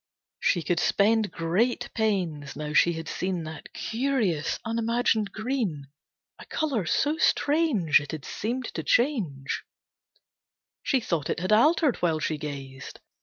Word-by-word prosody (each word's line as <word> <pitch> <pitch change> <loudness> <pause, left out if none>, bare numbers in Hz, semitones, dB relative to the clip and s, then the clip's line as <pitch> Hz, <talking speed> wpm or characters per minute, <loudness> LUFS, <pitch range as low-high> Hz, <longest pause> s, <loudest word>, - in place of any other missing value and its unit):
She 175 -4 +1
could 175 0 0
spend 215 +3 +3
great 215 +9 0
pains, 175 -10 -1
now 150 0 -5
she 170 +2 +5
had 165 0 -6
seen 180 -2 -2
That 155 -1 -9
curious, 225 - -1
unimagined 230 -2 +1
green. 215 - -3 0.5
A - - -10
colour 265 - -1
so 295 - +1
strange 285 - +3
It 145 - -7
had 155 -3 -6
seemed 245 +4 -3
to 160 - -3
change. 175 - 0 1.2
She 265 -3 +1
thought 165 -8 -2
it - - -1
had 185 +4 -2
altered 295 +4 +4
while 165 -3 +1
she 155 -1 -2
gazed. 135 -3 -7
195 Hz, 135 wpm, -27 LUFS, 155-240 Hz, 1.2 s, she